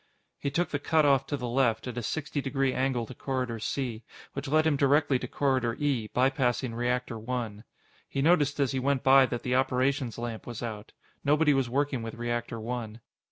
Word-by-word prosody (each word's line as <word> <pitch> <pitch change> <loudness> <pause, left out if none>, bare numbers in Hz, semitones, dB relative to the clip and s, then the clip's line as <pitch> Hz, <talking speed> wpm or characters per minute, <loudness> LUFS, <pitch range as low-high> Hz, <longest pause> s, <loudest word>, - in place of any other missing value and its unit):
He 140 - -1
took 170 +5 0
the 145 - -2
cutoff 140 -3 +3
to 145 - -2
the 125 -2 -4
left, 120 -3 +1
at 125 -3 -5
a 120 - -2
sixty 145 +4 -3
degree 135 -1 0
angle 130 -3 0
to 130 - -9
Corridor 125 -3 -3
C, 120 -1 -3 0.3
which - - -5
led 155 +3 +3
him 160 -2 +3
directly 140 -1 +3
to 125 - -5
Corridor 130 -3 0
E, 135 -7 0
by 130 +4 +2
passing 125 -3 0
Reactor 120 0 -1
One. 115 -2 -4 0.4
He - - -3
noticed 145 -1 +3
as 140 -3 +2
he 130 - -1
went 135 0 0
by 135 0 +7
that 120 -1 -4
the 125 - -1
operations 130 -1 +1
lamp 115 -2 -5
was 120 -1 -6
out. 110 -2 -6 0.3
Nobody 150 +1 +4
was 135 -3 +1
working 140 0 0
with 115 0 -6
Reactor 120 0 -3
One. 115 -1 -5
130 Hz, 200 wpm, -28 LUFS, 120-140 Hz, 0.4 s, by